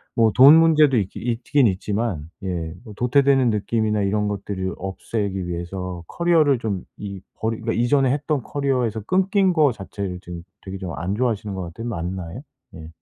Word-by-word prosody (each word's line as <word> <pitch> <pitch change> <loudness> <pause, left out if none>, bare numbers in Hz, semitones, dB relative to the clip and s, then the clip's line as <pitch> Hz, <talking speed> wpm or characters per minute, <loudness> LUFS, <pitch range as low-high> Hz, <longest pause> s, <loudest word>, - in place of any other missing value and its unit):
뭐 115 -2 +4
돈 140 +5 +9
문제도 155 -5 +5
있기 95 -3 -2
있긴 120 +3 +1
있지만 100 -4 -2
예 85 -4 -3
뭐 110 - -10
도태되는 135 +1 +3
느낌이나 105 0 0
이런 105 +1 0
것들을 95 -2 -3
없애기 95 0 -3
위해서 90 0 -5
커리어를 160 -6 +3
좀 100 -6 -3
이 100 -2 -7
버리 110 0 -2
그러니까 115 0 -2
이전에 130 +1 +3
했던 145 -1 -1
커리어에서 125 -6 -1
끊긴 190 - +2
거 155 -5 +4
자체를 95 -3 -6
지금 85 -2 -8 0.2
되게 95 0 -7
좀 90 -3 -6
안 90 +4 -2
좋아하시는 110 -4 -1
거 95 - -4
같아요. 90 +8 -7
맞나요? 90 0 -5 0.3
예. 80 -2 -9
105 Hz, 370 characters per minute, -22 LUFS, 95-130 Hz, 0.3 s, 돈